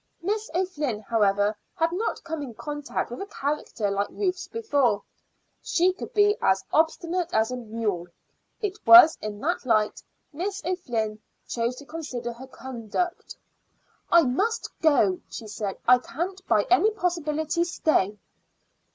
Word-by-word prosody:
Miss 425 +4 -1
O'Flynn, 300 - -1
however, 205 -1 +2 0.2
had 330 0 +1
not 415 +6 -2
come 320 -2 -4
in 250 -5 -7
contact 295 -3 -4
with 245 - -6
a 395 - -5
character 280 - -2
like 200 +1 0
Ruth's 375 -2 -2
before. 285 - +1 0.6
She 360 +2 +2
could 370 - -8
be 415 0 +5
as 190 0 +2
obstinate 335 +2 +1
as 220 +2 +2
a - - -2
mule. 215 -6 -3 0.5
It 415 -1 -3
was 345 -2 +10
in 210 -1 -5
that 345 +4 -1
light 215 -4 +1 0.3
Miss 385 +6 -3
O'Flynn 235 - -2 0.3
chose 235 +1 -1
to 285 - -11
consider 260 -7 -5
her 255 +3 -11
conduct. 260 - -4 0.8
"I 340 -1 +7
must 390 - 0
go," 250 - +3
she 225 - -7
said. 210 -2 -4
"I 250 +1 +7
can't 360 +9 -5
by 210 - +4
any 390 +4 +6
possibility 340 -4 -1
stay." 305 - +1
295 Hz, 145 wpm, -26 LUFS, 225-360 Hz, 0.8 s, was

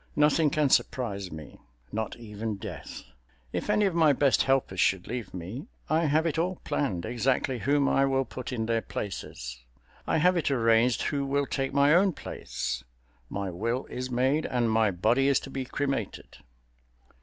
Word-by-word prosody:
Nothing 150 +1 +4
can 150 -1 +2
surprise 100 -7 0
me—not 75 - -7
even 110 -1 -5
death. 100 -7 -8 0.5
If - - -3
any 210 0 +3
of 195 - +1
my 160 -3 +5
best 140 0 +3
helpers 135 -8 +1
should 95 -1 +2
leave 120 -3 -5
me, 95 - -7 0.2
I 160 +1 +3
have 155 +2 +2
it 165 -1 0
all 180 +3 0
planned 95 -12 -1
exactly 125 +1 0
whom 140 +4 +2
I 135 - +3
will 135 0 +1
put 130 +2 -7
in 115 -3 -2
their 115 0 +1
places. 60 - -6 0.4
I - - +2
have 180 +4 +4
it 160 - +1
arranged 115 -2 +3
who 140 -2 -1
will 140 +1 0
take 135 0 -2
my 140 +1 +4
own 185 +2 +4
place—my 60 - -6
will 115 +8 -2
is 125 +1 -4
made 130 +5 +1
and 120 -2 +1
my 110 -1 +3
body 110 +9 +2
is 140 -2 +4
to 135 - -9
be 135 -1 -3
cremated. 135 -5 -3
125 Hz, 165 wpm, -28 LUFS, 100-140 Hz, 0.5 s, my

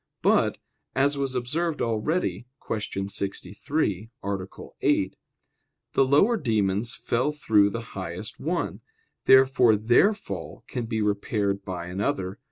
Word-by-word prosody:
But, - - +3 0.4
as 140 +2 +3
was 135 -2 -2
observed 150 +6 -1
already 120 +4 -1 0.2
(Q. 100 -2 -3
63, 100 - -2
A. 95 -1 -3 0.3
8), - - +2 0.8
the - - +5
lower 195 - +4
demons 110 - 0
fell 130 +5 0
through 110 -9 +3
the 115 +3 -4
highest 95 +4 -6
one. 170 +3 -2 0.4
Therefore 130 -3 +6
their 120 - +4
fall - - -7
can 125 -3 -4
be 110 -2 -1
repaired 100 -1 0
by 90 -3 -5
another. 95 +1 -2
110 Hz, 120 wpm, -26 LUFS, 100-135 Hz, 0.8 s, Therefore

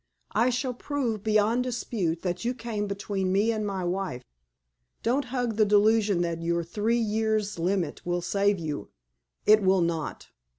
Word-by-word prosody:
I 235 +3 +3
shall 255 +1 -1
prove 245 -5 -2
beyond 220 +3 +3
dispute 220 -9 -2
that 180 +1 -2
you 245 +2 -1
came 225 -4 -3
between 200 -1 -2
me 205 +4 +3
and 215 -2 -2
my 195 -2 -2
wife. 180 -7 -2 0.8
Don't 260 +4 +1
hug 245 -3 -2
the 220 - +5
delusion 210 -2 +4
that 170 -1 -2
your 170 0 0
three 210 +7 0
years' 215 -3 0
limit 175 -2 -1
will 175 0 -1
save 200 +3 +2
you. 155 -4 -4 0.6
It 215 0 +6
will 190 -1 +3
not. 165 -3 -2
205 Hz, 160 wpm, -27 LUFS, 180-225 Hz, 0.8 s, It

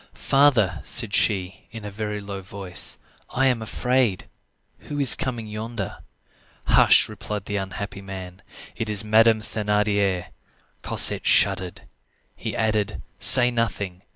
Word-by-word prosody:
"Father," 115 - +2
said 115 +2 +4
she, 95 -3 -1
in 115 -2 -10
a 105 - -7
very 105 0 -5
low 100 -1 -8
voice, 95 -1 -3 0.3
"I 135 - 0
am 125 -3 +1
afraid. 125 -2 -1 0.6
Who 145 - -5
is 140 -3 +7
coming 120 -4 -4
yonder?" 110 -1 -6 0.7
"Hush!" - - +4
replied 105 -2 -7
the 105 - -3
unhappy 100 +1 -6
man; 95 -1 -9 0.3
"it 110 - -4
is 105 -1 +1
Madame 110 +1 +3
Thénardier." 105 -4 -1 0.5
Cosette - - +2
shuddered. 90 -2 +1 0.5
He - - -6
added:— 105 -2 -2 0.2
"Say 125 -1 +7
nothing. 100 -6 -3
105 Hz, 125 wpm, -23 LUFS, 95-115 Hz, 0.7 s, is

